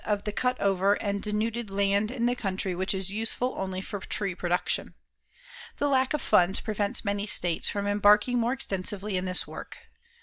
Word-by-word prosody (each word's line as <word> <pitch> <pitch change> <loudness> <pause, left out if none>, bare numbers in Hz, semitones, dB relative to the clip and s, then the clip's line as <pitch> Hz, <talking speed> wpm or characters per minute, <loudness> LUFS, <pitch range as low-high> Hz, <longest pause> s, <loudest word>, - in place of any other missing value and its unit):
of 205 -1 -1
the 210 - -3
cut 250 +4 -1
over 195 0 +2
and 200 -1 -3
denuded 220 +1 -2
land 200 +1 +1
in 240 -1 -2
the 245 +1 +2
country 195 -4 -2
which 185 +2 -1
is 190 0 -1
useful 225 +4 -1
only 190 -1 -3
for 205 +1 -6
tree 195 0 -2
production. 175 0 -1 0.8
The 290 - 0
lack 265 0 +2
of 300 - -4
funds 195 -2 +4
prevents 215 +2 -2
many 200 +1 -1
states 175 -5 +3
from 200 0 -3
embarking 210 +4 +4
more 235 +2 +1
extensively 200 -4 -2
in 185 0 -1
this 185 -1 +1
work. - - -9
205 Hz, 180 wpm, -27 LUFS, 195-225 Hz, 0.8 s, funds